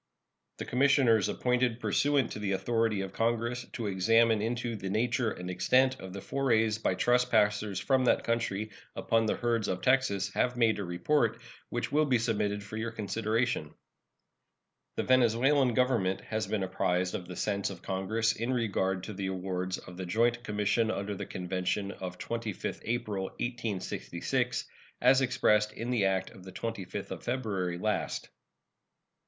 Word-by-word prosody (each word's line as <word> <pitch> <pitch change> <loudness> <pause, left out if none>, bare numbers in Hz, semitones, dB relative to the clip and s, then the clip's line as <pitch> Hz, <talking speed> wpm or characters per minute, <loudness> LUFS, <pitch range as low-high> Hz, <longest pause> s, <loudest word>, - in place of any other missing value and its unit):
The - - -5
commissioners 125 -5 +4
appointed 125 -1 +1
pursuant 140 -1 +2
to - - -5
the 100 -2 -1
authority 115 0 +1
of 95 -1 -5
Congress 115 +2 -1
to 115 - -4
examine 110 +3 +3
into 120 +1 -2
the 95 -2 -5
nature 115 +3 +1
and 90 -3 -6
extent 130 +8 +2
of 95 - -8
the 100 +1 -7
forays 115 -5 +1
by 95 - +1
trespassers 105 -4 +2
from 130 -2 +2
that - - +3
country 110 -2 -1 0.2
upon 115 -1 +1
the - - +1
herds 115 -3 0
of 90 0 -2
Texas 100 -7 +2
have 125 0 +1
made 110 -3 +3
a - - -2
report, 115 +7 +1 0.3
which 120 - -3
will 155 +1 +3
be 130 -4 +3
submitted 105 -3 -1
for 105 +1 -7
your 115 +1 -2
consideration. 110 -4 -1 1.2
The - - -1
Venezuelan 130 +1 +3
Government 115 -7 +2
has 110 -1 -3
been 100 -1 -1
apprised 90 -1 0
of 90 - -4
the 90 - -7
sense 100 0 -1
of 95 -2 -9
Congress 110 +4 0
in 115 +3 -2
regard 95 -6 0
to 105 - -6
the 95 0 -3
awards 95 0 -2
of 90 -1 -11
the 95 - -4
joint 120 +5 +1
commission 105 +1 +1
under 100 -1 -2
the 100 - -6
convention 95 +2 -2
of 90 -2 -7
25th 115 -4 -4
April, 110 -5 -2
1866, 115 -3 -2 0.3
as 130 +2 +5
expressed 105 -5 +3
in 120 +2 -4
the 115 -5 +2
act 95 0 0
of 95 - -14
the 95 - -9
25th 100 -2 -5
of - - -5
February 100 -8 -2
last. 105 +3 -2
110 Hz, 160 wpm, -30 LUFS, 95-120 Hz, 1.2 s, as